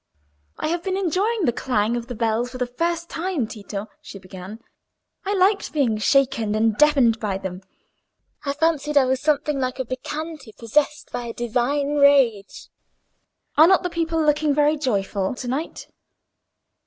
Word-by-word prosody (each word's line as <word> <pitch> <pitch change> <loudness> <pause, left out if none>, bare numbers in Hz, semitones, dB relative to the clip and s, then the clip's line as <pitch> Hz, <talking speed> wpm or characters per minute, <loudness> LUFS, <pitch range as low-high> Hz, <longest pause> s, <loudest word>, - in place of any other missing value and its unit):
"I - - -2
have 340 +1 -1
been 380 +1 -2
enjoying 390 +3 0
the 240 - +2
clang 230 -2 0
of 240 -1 -4
the 245 - -6
bells 230 +1 0
for 255 - -8
the 250 - -1
first 335 +7 -2
time, 335 -7 -2
Tito," 205 -1 -7 0.2
she 295 -9 -10
began. 190 +2 -10 0.7
"I 400 +1 0
liked 395 +2 +2
being 245 -8 +1
shaken 250 -3 +2
and 220 0 +2
deafened 265 -5 +4
by 205 -4 -2
them: 190 -1 -6 0.8
I 280 -1 -1
fancied 300 -1 0
I 275 - +6
was 260 0 0
something 295 -1 0
like 255 -1 -2
a 260 - -3
Bacchante 295 0 -6
possessed 290 +6 0
by 245 - -4
a 230 - -5
divine 260 +5 -1
rage. 270 -8 +3 0.9
Are 315 +2 +8
not 380 0 +4
the 360 - -2
people 330 -1 -1
looking 300 -1 +2
very 295 +1 +3
joyful 205 -6 -1
to 250 - -7
night?" 275 +7 -4
270 Hz, 165 wpm, -22 LUFS, 230-310 Hz, 0.9 s, Are